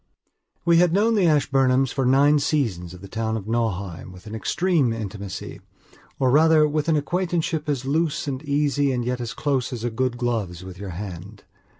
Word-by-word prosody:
We 170 -1 +5
had 175 -1 +4
known 215 +4 +3
the 200 -5 +3
Ashburnhams 135 -3 +2
for 135 -2 0
nine 145 +3 +5
seasons 105 - -1
of 90 - -14
the 100 - -9
town 110 +2 -2
of 100 - -7
Nauheim 100 -7 -2
with 90 +2 -14
an 110 - -8
extreme 160 - +1
intimacyor, 100 -3 -6 0.6
rather 150 +4 +5
with 150 +1 -1
an 160 - +3
acquaintanceship 165 0 -1
as 135 -3 -1
loose 155 +2 0
and 135 -1 -3
easy 145 -1 +1
and 120 -2 -2
yet 125 0 -2
as 120 - -5
close 135 -4 -1
as 120 -3 -5
a 120 - -1
good 125 +1 -1
glove's 110 -8 -2
with 95 -1 -10
your 100 -1 -6
hand. 95 +2 -8
130 Hz, 185 wpm, -23 LUFS, 110-150 Hz, 0.6 s, We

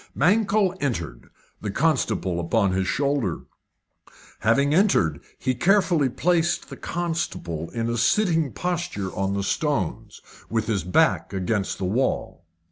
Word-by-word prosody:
Mankell 200 +3 +2
entered, 85 - -3 0.3
the 105 - -3
constable 110 - 0
upon 100 +3 +1
his 95 0 0
shoulder. 140 - 0 1.0
Having 140 +6 +2
entered, 155 - +3 0.2
he 130 - 0
carefully 170 - +3
placed 170 +5 0
the - - -6
constable 160 - -3
in 115 -1 -3
a 115 0 -1
sitting 160 - +2
posture 170 - -3
on 95 0 -1
the 100 - -1
stones, 140 - -2 0.3
with 115 -1 0
his 105 -6 -1
back 90 +2 +2
against 95 +1 -1
the 95 - -3
wall. 100 -5 -1
120 Hz, 125 wpm, -24 LUFS, -, 1.0 s, entered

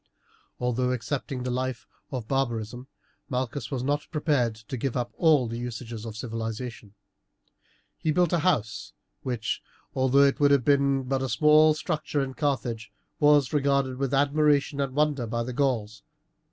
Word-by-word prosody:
Although 125 +1 0
accepting 130 +1 -3
the 125 - -2
life 130 -1 -3 0.2
of 125 -5 -5
barbarism 120 -2 -2 0.4
Malchus 130 0 -3
was 130 -3 -3
not 145 +2 -1
prepared 145 -7 +1
to 110 +2 -8
give 130 +1 -2
up 120 -1 -2
all 155 -7 +4
the 115 +1 -5
usages 120 -2 -6
of 110 -1 -7
civilization. 115 -2 -5 1.0
He 160 - -1
built 175 +1 +2
a 170 - +3
house, 115 - -1 0.3
which, 120 -4 -2 0.3
although 130 +1 +4
it 140 -1 +3
would 145 -1 +5
have 140 -4 +3
been 140 -1 +3
but 135 +1 -1
a 135 - -2
small 155 +1 +5
structure 150 -2 -2
in 130 -1 -5
Carthage, 130 -6 -2 0.3
was 145 -2 +4
regarded 140 -2 +1
with 135 -1 -1
admiration 145 0 +2
and 135 -1 -3
wonder 145 -5 +1
by 115 +1 -2
the 125 +1 -5
Gauls. 115 -6 -1
130 Hz, 155 wpm, -27 LUFS, 120-145 Hz, 1.0 s, would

